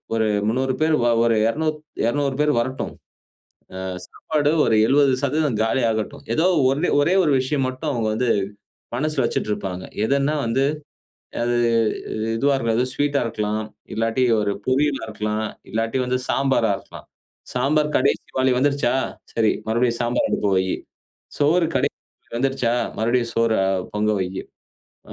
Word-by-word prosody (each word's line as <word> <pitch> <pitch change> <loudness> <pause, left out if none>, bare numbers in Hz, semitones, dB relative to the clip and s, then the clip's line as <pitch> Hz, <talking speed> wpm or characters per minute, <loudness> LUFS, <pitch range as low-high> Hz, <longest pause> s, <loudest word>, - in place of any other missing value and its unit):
ஒரு 110 - +2 0.2
300 130 +3 +1
பேர் 160 0 +3
வ - - +3 0.2
ஒரு 115 -1 +3 0.7
200 140 +1 0
பேர் 150 0 +3
வரட்டும். 130 +2 -3 0.9
ஆ - - -5 0.3
சாப்பாடு 150 -2 -1
ஒரு 110 - +2
70% 140 -1 +2
காலியாகட்டும். 110 -2 0
ஏதோ 165 +3 +2 0.5
ஒரே 170 +5 +2
ஒரு 150 - +2
விஷயம் 135 +1 0
மட்டும் 130 +4 -4
அவங்க 115 -3 -1
வந்து 120 +2 0 0.7
மனசுல 150 0 0
வச்சுட்டு 105 - -2
இருப்பாங்க. 95 -2 -5 0.2
எதுன்னா 140 +4 +1
வந்து 125 +4 +1 0.8
அது 120 0 +1 0.8
இதுவா 140 +4 +2
இருக்கும், 120 +1 0
ஸ்வீட்‌டா 145 -1 +1
இருக்கலாம். 110 -1 -2 0.3
இல்லாட்டி 115 +3 +1 0.2
ஒரு 100 -1 0
பொரியலா 135 +2 +1
இருக்கலாம். 105 0 -2 0.3
இல்லாட்டி 115 +4 -1
வந்து 125 0 0
சாம்பாரா 135 -5 +2
இருக்கலாம். - - -13 0.5
சாம்பார் 150 +4 +1
கடைசி - - +1
வாலி 130 0 +3
வந்துருச்சா? 140 -2 +2 0.4
சரி, 110 -2 +3 0.2
மறுபடியும் 120 +1 +1
சாம்பார் 120 +1 +1
அடுப்ப 100 - 0
வை. 95 - +2 0.7
சோறு 160 +4 +3
கடைசி 140 +3 0 0.4
வந்துருச்சா? 125 -3 +1 0.2
மறுபடியும் 120 +1 +1
சோற 115 -1 +2
அ - - +1 0.3
பொங்க 105 +1 +1
வை. 90 - -1 0.8
அ - - -7
125 Hz, 135 wpm, -22 LUFS, 115-140 Hz, 0.9 s, பேர்